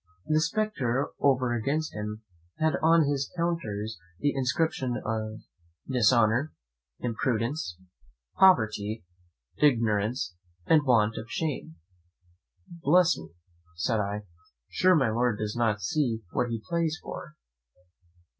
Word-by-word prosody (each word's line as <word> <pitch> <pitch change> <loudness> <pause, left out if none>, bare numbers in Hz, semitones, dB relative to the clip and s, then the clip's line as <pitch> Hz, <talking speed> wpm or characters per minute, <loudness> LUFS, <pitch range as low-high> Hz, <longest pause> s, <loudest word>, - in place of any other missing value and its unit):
The 155 0 +2
spectre 160 - 0
over 130 -3 +2
against 140 +7 -1
him 105 +1 -5 0.3
had 160 0 +2
on 165 0 +5
his 140 -1 -1
counters 115 -11 -2 0.2
the 145 +7 0
inscriptions 130 -1 0
of 110 0 -3 0.5
"Dishonour, 120 +2 +3 0.5
Impudence, 115 - -1 0.6
Poverty, 110 - +3 0.5
Ignorance, 115 -5 +2 0.3
and 160 -2 +5
Want 115 -3 +3
of 115 - -7
Shame." 145 - -3 0.9
"Bless 170 0 +3
me!", 80 -7 -10 0.5
said 110 +6 0
I; 105 +1 -2 0.5
"sure, 185 0 +4
my 130 -8 +2
Lord 120 -1 +1
does 105 0 -3
not 110 -3 +1
see 115 - 0
what 120 - 0
he 115 -2 -4
plays 165 -2 0
for?" 150 - -8
125 Hz, 110 wpm, -28 LUFS, 110-155 Hz, 0.9 s, on